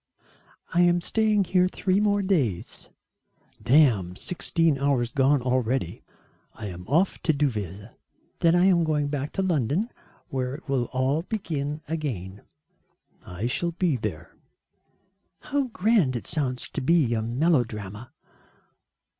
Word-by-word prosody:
"I 175 - +4
am 175 0 +4
staying 215 +2 +2
here 180 0 +2
three 185 +1 0
more 205 -1 +2
days." 140 - -1 0.7
"Damn 115 - +3
sixteen 165 - 0
hours 135 -4 +1
gone 135 -1 +2
already, 125 -6 -1 0.5
I 110 - -8
am 90 0 -9
off 170 - +1
to 160 - +2
Deauville." 105 - -2 0.5
"Then 165 0 +4
I 175 +1 +4
am 180 -3 +4
going 150 -2 0
back 145 0 -3
to 195 - -1
London 170 - 0 0.4
where 130 0 -2
it 155 - -13
will 135 -3 0
all 130 +5 0
begin 155 -7 -4
again." 115 - -4 0.9
"I 90 +5 -5
shall 170 +8 -1
be 170 -3 +1
there." 90 -9 -5 1.0
"How 285 -2 -1
grand 210 - +2
it 120 - -4
sounds 135 -5 -1
to - - -4
be 140 -4 +3
a 110 - 0
melodrama." 115 - -1
145 Hz, 130 wpm, -25 LUFS, 120-175 Hz, 1.0 s, I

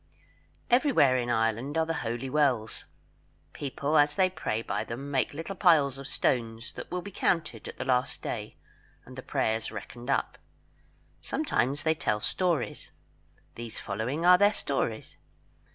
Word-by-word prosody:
Everywhere 245 - +5
in 120 -1 0
Ireland 115 +5 0
are 160 - +3
the 165 - -1
holy 120 +3 -3
wells. 130 -6 +1 0.7
People 145 +2 0
as 145 0 +4
they 185 +1 +3
pray 115 -10 -2
by - - -2
them 135 +5 -6
make 135 -2 +1
little 165 +6 -5
piles 150 -8 +4
of 135 - -7
stones, 115 -4 -1
that - - -8
will 180 0 -3
be 200 - -8
counted 155 - -1
at - - -8
the - - -4
last 130 -1 0
day - - -4 0.5
and - - -12
the - - -6
prayers 110 0 -1
reckoned 120 +3 -8
up. - - 0 0.8
Sometimes 145 - 0
they 160 - +3
tell 105 -9 -1
stories. 170 - -1 0.6
These 115 -1 -6
following 120 - -2
are 180 0 +8
their 205 +1 +5
stories. 125 - -2
135 Hz, 150 wpm, -29 LUFS, 115-160 Hz, 0.8 s, are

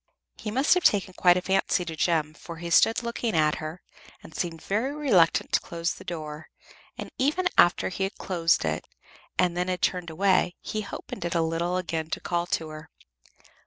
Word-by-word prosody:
He 215 - -6
must 265 +7 +3
have 360 -1 +1
taken 195 -2 +3
quite 180 0 +4
a 180 - -2
fancy 190 -1 +1
to 160 - -5
Jem, 155 -2 +1
for 170 +1 -10
he 170 +1 -6
stood 225 +7 +4
looking 235 -3 -2
at 155 -1 +3
her, 155 +3 -7 0.4
and 160 - -13
seemed 165 -2 -3
very 240 +8 -1
reluctant 205 - +3
to - - +4
close 170 0 -3
the - - -12
door, 155 -3 -6 0.5
and - - -7
even 305 +8 +2
after 175 - +4
he 190 +1 -2
had 195 - -6
closed 170 - +1
it, 80 0 -1 0.5
and 175 -1 +2
they 180 - +1
had 180 -1 -3
turned 180 -2 0
away, 185 +1 +2
he 215 -1 -4
opened - - -7
it 175 0 -2
a 165 - +3
little 170 +2 -1
again 165 -3 -3
to - - -2
call 175 0 -2
to 160 -2 -2
her. 155 0 -10
175 Hz, 200 wpm, -26 LUFS, 165-195 Hz, 0.5 s, quite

